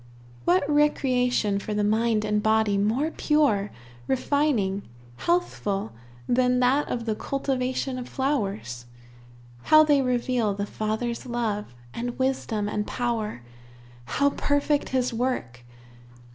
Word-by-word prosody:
What 185 +9 +3
recreation 250 -8 +2
for 210 +1 -4
the 210 - +1
mind 215 +1 +2
and 210 0 +1
body 220 -1 +2
more 225 +10 +1
pure, 280 -13 +2 0.4
refining, 260 -8 +1 0.4
healthful, 210 - -1 0.4
than 250 0 +3
that 260 +4 +3
of 235 -2 -3
the 220 - 0
cultivation 260 +1 -2
of 245 - -7
flowers? 200 - -2 0.8
How 310 0 +7
they 290 -2 +4
reveal 245 -4 0
the 200 0 -2
Father's 220 +4 -3
love, 215 - -2 0.2
and 240 +1 -4
wisdom, 255 -5 -1
and 210 0 -2
power! 225 - -2 0.6
How 285 - +1
perfect 285 +1 0
his 255 -1 0
work! 225 - -2
240 Hz, 115 wpm, -25 LUFS, 210-265 Hz, 0.8 s, How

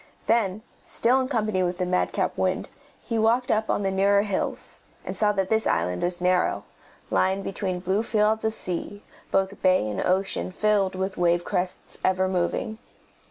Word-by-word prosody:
Then, 215 -3 +1 0.2
still 250 +3 +2
in 260 - -1
company 215 -7 0
with 180 -1 -1
the 180 - -1
madcap 180 0 0
wind, - - -1 0.3
he 230 -2 -2
walked 235 +3 +2
up 220 0 +1
on 205 - +1
the 195 - 0
nearer 200 +1 +3
hills, 200 -3 -2 0.3
and - - -4
saw 210 -1 +3
that 195 0 -1
this 220 0 +2
island 90 +1 0
was 175 0 +1
narrow, 180 0 +1 0.5
lying 190 +1 +1
between 190 -2 -2
blue 190 +3 0
fields 220 -1 +1
of 220 0 0
sea, 195 +3 -3 0.3
both 195 +1 0
bay 185 - +3
and 105 - -2
ocean 190 0 0
filled 200 -1 +1
with 190 +1 -3
wave 175 0 +2
crests, 180 -1 -4
ever 185 0 +2
moving. 185 +4 -1
195 Hz, 170 wpm, -25 LUFS, 185-215 Hz, 0.5 s, nearer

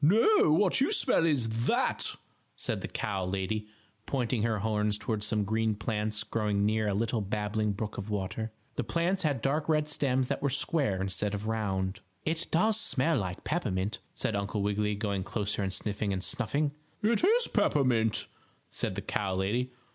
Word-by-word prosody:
"No, 215 - +5
what 185 +8 +3
you 285 - +3
smell 250 - +3
is 115 -6 0
that," - - +1 0.4
said - - -2
the - - -3
cow 95 -1 -2
lady, 100 +3 -2 0.4
pointing 125 -4 0
her 110 -1 +1
horns 105 0 0
toward 110 -1 -2
some 105 -1 0
green 110 +1 +1
plants 105 0 -1
growing 105 -2 0
near 110 0 +1
a 100 - +1
little 115 +1 0
babbling 105 +1 -1
brook 105 0 -4
of 100 +2 -6
water. 105 +2 -2 0.3
The - - +1
plants 175 - 0
had 145 -7 0
dark 150 +3 0
red 150 -1 +3
stems 130 -3 +1
that - - -2
were 140 - +2
square 140 - +1
instead 100 +2 -1
of 105 +2 -4
round. 95 -4 -1 0.3
"It 165 +1 0
does 215 +6 +3
smell 150 +2 +2
like 95 -3 -4
peppermint," 105 - -1 0.2
said 110 - -1
Uncle 100 +1 -1
Wiggily, 105 +1 +1
going 100 -2 -1
closer 105 +1 -2
and 95 -1 -1
sniffing 105 +1 -2
and 95 -1 -2
snuffing. 140 +8 0 0.3
"It 230 +7 +2
is 465 +6 +5
peppermint," 120 -6 +2 0.5
said - - -2
the - - -4
cow 95 -2 -1
lady. 115 +7 0
110 Hz, 175 wpm, -30 LUFS, 105-140 Hz, 0.5 s, No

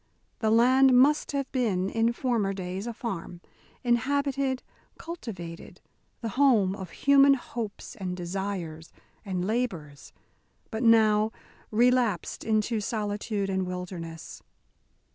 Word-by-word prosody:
The 220 - +1
land 255 +3 +5
must 295 +3 +3
have 280 -2 -3
been, 205 -8 0
in 225 +3 +1
former 235 -5 0
days, 190 +2 -5
a 235 - -3
farm, 180 -7 -5 0.4
inhabited, 270 +2 0 0.3
cultivated, 195 - -8 0.4
the 230 - -3
home 230 -7 +3
of 190 -3 -7
human 280 +5 +5
hopes 235 -4 -6
and 185 -2 -4
desires 175 -3 -4 0.3
and 185 -3 -2
labours, 185 - -3 0.6
but 220 - -3
now 220 -2 +4 0.4
relapsed 240 -4 +1
into 215 0 0
solitude 205 -1 -2
and 190 -1 -1
wilderness. 180 -3 -7
215 Hz, 110 wpm, -27 LUFS, 185-250 Hz, 0.6 s, land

